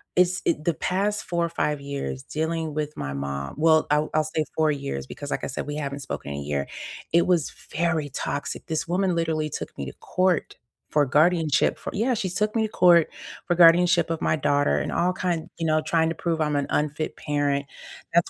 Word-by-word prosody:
it's 180 0 +3
it 155 -2 +1
the 170 -1 +1
past 205 +6 -1
4 170 -1 0
or - - -3
5 150 -3 -1
years 140 -1 -4
dealing 160 +1 -2
with 150 0 -3
my 70 0 -4
mom 70 0 -4
well, 160 0 +4
I'll 150 +1 +2
I'll 155 - +4
say 155 0 -1
4 155 -1 +3
years 140 - -4
because, - - -8
like - - -2
I - - -1
said, - - -5
we 145 - -3
haven't 140 -2 -4
spoken 100 - -5
in 70 - -4
a - - -4
year, 70 -1 -2 0.5
it 170 +1 +4
was 175 -5 +2 0.3
very 160 -3 +1
toxic. 145 +1 -4
This 160 +1 -2
woman 185 +1 +1
literally 160 -2 0
took - - -6
me 70 - -4
to 65 - -7
court 185 -3 0 0.3
for 150 -1 +3
guardianship 155 +2 +3
for - - -6
yeah, 235 +5 +1
she 190 -4 -2
took 210 +4 -1
me 225 - +2
to 215 - -1
court 170 -5 +5 0.4
for 175 - +1
guardianship 170 0 +6
of 165 - -2
my 155 - +2
daughter 145 0 +2
and - - -3
all 175 +2 +2
kind 175 -2 -2
you 165 - -1
know, 155 0 +3
trying 160 +1 +2
to 165 - -3
prove 165 0 -1
I'm 150 -1 +1
an 140 - +1
unfit 150 +1 -1
parent. 145 -1 0 0.5
That's 170 0 +3
155 Hz, 215 wpm, -25 LUFS, 145-170 Hz, 0.5 s, guardianship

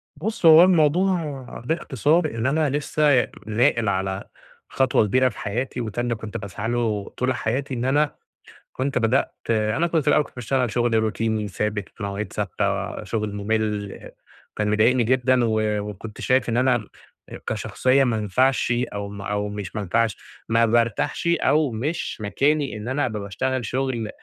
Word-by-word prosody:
بُص 215 +5 -3
هو 160 +1 +9
الموضوع 170 -3 +2 0.2
باختصار 155 +1 +1
إن 115 +1 -2
أنا 150 +2 +2
لسه 145 -1 +2 0.2
ناقل 115 -1 +2
على 95 0 -2 0.5
خطوة 130 -4 +2
كبيرة 130 +5 +3
في - - -13
حياتي، 120 +4 -3
وده 115 +1 -3
اللي 120 -1 -1
كنت 110 +1 -6
باسعى 105 +2 -5
له 110 -4 -1
طول 130 +1 +1
حياتي، 130 +4 -2
إن 120 +1 -2
أنا 145 +2 +1 0.6
كنت 135 +1 -1
بدأت 125 +3 +1 0.2
أنا 110 +9 +1
كنت 165 -2 +1
في - - -14
الأول 150 0 +4
كنت - - -17
باشتغل 125 -1 -1
شغل 120 -1 +1
روتيني 110 -1 0
ثابت، 105 0 -3
في 105 - -8
مواعيد 100 0 -4
ثابتة، - - -2
شغل 105 -2 -3
مُمل، 105 -1 -2 0.4
كان 105 -1 0
مضايقني 115 +3 +3
جدًا، 130 0 +2
و 110 -1 +1 0.3
وكنت 105 +2 -9
شايف 130 -1 +2
إن 115 - 0
أنا 125 -4 +2 0.6
كشخصية 135 +2 +1
ما 115 -3 +1
أنفعش 120 +4 +1 0.2
أو 100 0 -4
م 100 -1 -8
أو 105 +1 -2
مش 105 -1 -6
ما 105 - -2
أنفعش، 110 +3 0 0.3
ما 115 +1 +4
بارتاحش، 115 - 0
أو 150 -4 +2
مش 145 +10 -3
مكاني 135 +3 0
إن 105 +3 -7
أنا 135 +2 0
أبقى 110 -4 -3
باشتغل 120 +5 -2
شغل 125 -2 -2
120 Hz, 160 wpm, -23 LUFS, 105-135 Hz, 0.6 s, هو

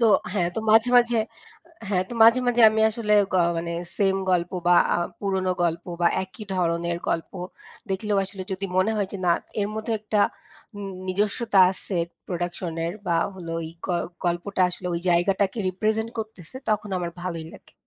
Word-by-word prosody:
তো 230 - +5 0.3
হ্যাঁ, 175 -4 +1
তো 225 - -1
মাঝে, 225 +2 +6
মাঝে 240 -1 +4 0.7
হ্যাঁ, 185 -2 +1
তো - - -8
মাঝে, 230 +3 +7
মাঝে 240 -1 +3
আমি 220 0 0
আসলে 215 -1 -1 0.2
গ - - -2 0.2
মানে 170 0 -3 0.2
same 195 -1 +2
গল্প 175 -1 +1 0.2
বা 175 0 +6 0.2
আ - - +3 0.2
পুরনো 190 -2 0
গল্প 170 0 0 0.2
বা 175 - +4 0.2
একই 210 +3 -11
ধরনের 170 -1 0
গল্প 165 - -2 0.6
দেখলেও 205 +1 0
আসলে 190 0 -6
যদি 195 +1 -2
মনে 190 +4 +3
হয় 200 -2 0
যে - - -3
না 170 - +5 0.3
এর 200 - 0
মধ্যে 220 +1 -3
একটা 210 -1 0 0.6
উন 205 - -6 0.2
নিজস্বতা 205 +2 +1
আছে 190 0 -5 0.3
production 175 -1 -3
এর 170 - -2
বা 170 -1 +2 0.2
হলো 175 -3 -8
ওই 160 - -5 0.2
গ - - -12 0.4
গল্পটা 175 +2 0
আসলে 180 0 -6
ওই 170 - -2
জায়গাটাকে 190 +5 +2
represent 215 +4 -1
করতেছে, 215 -1 -7
তখন 210 0 0
আমার 175 -1 -3
ভালোই 170 -3 -4
লাগে। - - -16
190 Hz, 175 wpm, -24 LUFS, 175-215 Hz, 0.7 s, মাঝে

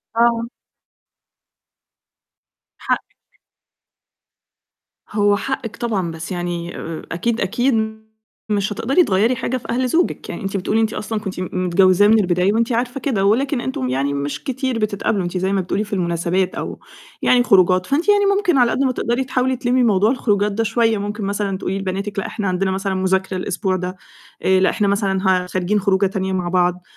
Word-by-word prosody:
آه. 235 0 +2 2.3
حقِّك. - - -5 1.7
هو 205 -1 +3
حقِّك 235 -3 -4
طبعًا، 200 -8 -1
بس 160 +2 -7
يعني 175 -1 -4
آآ، 165 -1 -6
أكيد، 225 +7 -1
أكيد 220 0 -1 0.4
مش 205 0 0
هتقدري 270 - +2
تغيّري 215 +4 +2
حاجة 255 +1 -2
في 250 - -11
أهل 255 +2 0
زوجِك، 335 +7 0
يعني - - -5
أنتِ 195 +1 -2
بتقولي 215 +4 0
أنتِ 220 0 0
أصلًا 215 +1 -3
كنت 195 -3 -6
م 185 - -3 0.2
متجوّزاه 185 +2 +4
من 220 +1 +5
البداية 180 0 +2
وأنتِ 230 +3 +1
عارفة 245 +3 -1
كده 225 -8 0
ولكن 255 +5 +2
أنتم 130 - -3
يعني 135 +2 0
مش 140 0 -4
كتير 260 -2 -2
بتتقابلوا، 205 -2 0
أنتِ 175 +1 -3
زي 190 +2 0
ما 195 - +1
بتقولي 190 +3 -1
في 210 0 -9
المناسبات 175 +1 0
أو - - -5 0.4
يعني 245 -1 +4
خروجات، 185 -4 +4
فأنتِ 310 +8 0
يعني 410 0 +5
ممكن 365 -7 +2
على 245 -2 +4
قد - - -1
ما 260 - +2
تقدري 240 +1 -1
تحاولي 260 0 0
تلمّي 250 0 +1
موضوع 210 -1 +3
الخروجات 210 -5 +1
ده 220 +3 -1
شوية. 225 0 +2
ممكن 205 +1 -4
مثلًا 200 -1 -2
تقولي 190 +1 -3
لبناتِك 195 +2 -3
لأ، - - -3
إحنا 205 -3 -3
عندنا 190 +1 0
مثلًا 195 0 -2
مُذاكرة 190 0 0
الأسبوع 185 +1 -1
ده، 185 0 -4 0.5
آآ، 190 0 +3
لأ، 190 - +4
إحنا 205 - 0
مثلًا 195 -1 +1
ه 185 -1 +3
خارجين 185 +3 0
خروجة 195 0 +2
تانية 190 0 -2
مع 180 -2 -1
بعض. 180 0 +1
200 Hz, 175 wpm, -20 LUFS, 185-235 Hz, 2.3 s, من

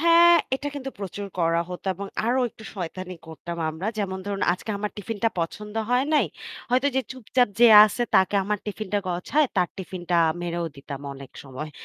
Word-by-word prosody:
হ্যাঁ, 340 +1 +7 0.2
এটা 280 +2 -3
কিন্তু 270 -1 -5
প্রচুর 200 0 -5
করা 165 0 +2
হতো 180 +1 -8
এবং 200 +3 -6 0.2
আরো 250 +2 +2
একটু 220 - -15
শয়তানি 185 0 -5
করতাম 170 +1 -7
আমরা। 160 +5 -5
যেমন 190 -2 -2
ধরুন 200 -1 -2
আজকে 185 +4 -5
আমার 210 0 -2
টিফিনটা 225 +2 -1
পছন্দ 210 +6 -5 0.2
হয় 250 +2 +3
নাই। 300 - +4 0.4
হয়তো 255 +3 +3
যে - - +4
চুপচাপ 255 -1 +1
যে 240 - +9 0.2
আছে 215 +3 -1
তাকে 190 +2 +4
আমার 210 +1 -1
টিফিনটা 210 -1 -2
গছায় 185 +12 +1
তার 180 -2 +3
টিফিনটা 180 -2 -3 0.3
মেরেও 170 0 -2
দিতাম 140 0 -7
অনেক 135 -1 -11
সময়। 140 +3 -7
200 Hz, 175 wpm, -25 LUFS, 175-235 Hz, 0.4 s, যে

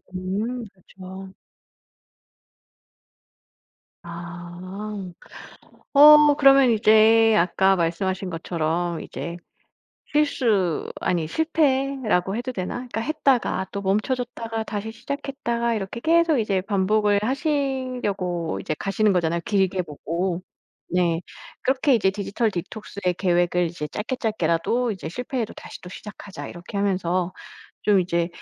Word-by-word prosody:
음. 210 +7 -3
그쵸. 190 +1 -11 2.7
아. 170 0 -8 1.4
어 300 +1 +9
그러면 275 -3 +6
이제 220 0 +5
아까 190 +2 +3
말씀하신 185 +2 -1
것처럼 170 0 -2
이제 170 +4 -6 0.7
실수 230 - +1
아니 170 -3 0
실패라고 270 - +1
해도 245 +2 -3
되나? 185 -7 -4
그러니까 245 -2 -4
했다가 265 -8 +1
또 200 - -4
멈춰졌다가 225 +2 -2
다시 215 +1 -5
시작했다가 235 -2 -3
이렇게 210 +2 -4
계속 330 0 +3
이제 200 -4 0
반복을 205 +1 +2
하시려고 255 - -1
이제 155 - -3
가시는 205 +1 +1
거잖아요, 170 -1 0
길게 190 -2 +1
보고. 170 +4 -3 0.5
네. 175 -2 +1 0.4
그렇게 265 +1 +2
이제 200 -5 +3
디지털 205 +3 -1
디톡스의 190 0 -4
계획을 175 -1 +2
이제 155 -2 -5
짧게 220 +9 -4
짧게라도 220 +3 0
이제 185 -5 -6
'실패해도 245 - -4
다시 - - -10
또 180 - -10
시작하자.' 205 0 -9
이렇게 175 +3 -8
하면서 185 -2 0 0.5
좀 205 -2 +4
이제 170 -1 0
200 Hz, 265 characters per minute, -24 LUFS, 180-245 Hz, 2.7 s, 어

